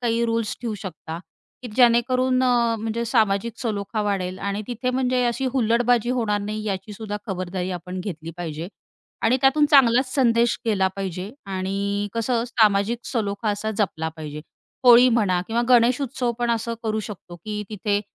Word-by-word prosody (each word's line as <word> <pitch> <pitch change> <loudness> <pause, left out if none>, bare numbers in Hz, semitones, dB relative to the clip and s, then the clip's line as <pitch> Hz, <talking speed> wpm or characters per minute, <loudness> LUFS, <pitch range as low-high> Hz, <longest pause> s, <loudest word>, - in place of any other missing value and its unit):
काही 235 -1 +1
रूल्स 230 -1 -1
ठेवू 230 -3 -3
शकता, 165 -3 -7 0.4
की 245 - -6
जेणेकरून 255 +1 +4
अ, 235 -2 +2
म्हणजे 225 +2 -2
सामाजिक 220 -2 +1
सलोखा 215 -2 -2
वाढेल 190 -3 -2
आणि 200 +1 -3
तिथे 250 +1 -2
म्हणजे 255 -1 +1
अशी 240 +3 -1
हुल्लडबाजी 240 -1 +2
होणार 225 -5 0
नाही 215 +1 -4
याची 200 +1 -3
सुुद्धा 210 0 -5
खबरदारी 185 -1 -3
आपण 180 +1 -5
घेतली 165 -4 -6
पाहिजे 165 0 -5 0.5
आणि 240 +3 +4
त्यातून 280 +3 +4
चांगलाच 255 -2 +5
संदेश 235 -3 +3
केला 200 -4 +2
पाहिजे 190 +1 -4 0.2
आणि 200 +2 -2
कसं 230 +1 0
सामाजिक 220 -1 +2
सलोखा 210 -2 -1
असा 205 +1 -2
जपला 160 -6 -1
पाहिजे. 150 -1 -7 0.4
होळी 245 +1 +8
म्हणा 205 -7 +2
किंवा 230 +1 0
गणेशउत्सव 250 +1 +3
पण 240 -1 0
असं 230 0 -1
करू 220 -1 -1
शकतो 190 -4 -9
की 210 +3 -5
तिथे 205 -1 -1
220 Hz, 155 wpm, -23 LUFS, 195-240 Hz, 0.5 s, होळी